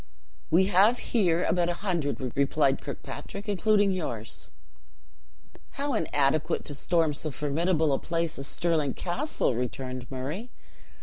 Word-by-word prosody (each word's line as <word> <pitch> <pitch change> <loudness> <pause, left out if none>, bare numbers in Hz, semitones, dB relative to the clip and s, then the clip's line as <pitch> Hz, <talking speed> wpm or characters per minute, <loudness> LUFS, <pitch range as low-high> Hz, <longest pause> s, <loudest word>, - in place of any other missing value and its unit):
"We 180 +4 +5
have 200 +5 +5 0.2
here 180 -7 +3
about 175 0 +2
a 175 - 0
hundred," 170 -8 -1 0.2
replied 140 0 +2
Kirkpatrick, 200 +2 -7
"including 205 0 +3
yours." 120 - -4 1.2
"How 280 0 -2
inadequate 155 - +1
to 145 - -3
storm 160 +2 +1
so 155 +2 -4
formidable 155 +3 +1
a - - +1
place 165 -2 -2
as 135 - -5
Stirling 160 -6 0
Castle!" 185 - -1
returned 125 +1 -4
Murray. 145 - -4
165 Hz, 125 wpm, -28 LUFS, 140-185 Hz, 1.2 s, We